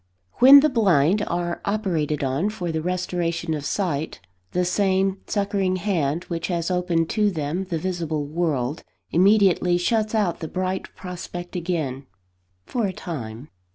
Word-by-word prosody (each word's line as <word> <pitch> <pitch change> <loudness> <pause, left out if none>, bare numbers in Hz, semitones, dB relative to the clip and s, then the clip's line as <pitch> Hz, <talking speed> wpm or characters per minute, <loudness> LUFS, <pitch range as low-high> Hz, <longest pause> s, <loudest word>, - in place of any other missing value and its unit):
WHEN 275 +3 +10
the 305 - +3
blind 195 - +3
are 175 0 -2
operated 170 -9 -1
on 140 +9 0
for 180 -6 -4
the 160 0 -2
restoration 175 -1 -2
of 150 -2 -3
sight, 160 -6 -2 0.3
the 180 0 +1
same 190 +1 +1
succouring 200 -2 0
hand 170 -5 -1
which 170 -2 -4
has 170 -1 -1
opened 175 -2 +1
to 210 -2 +2
them 165 +1 -2
the 175 -3 -2
visible 160 -4 -2
world, 150 -3 -1 0.3
immediately 185 -1 +4
shuts 215 +4 0
out 200 -6 +1
the 160 - -4
bright 185 +2 -2
prospect 175 -1 -7
again, 155 -7 -3 0.6
for 235 -4 -1
a 190 - -4
time. 125 -7 -7
175 Hz, 145 wpm, -23 LUFS, 160-195 Hz, 0.6 s, WHEN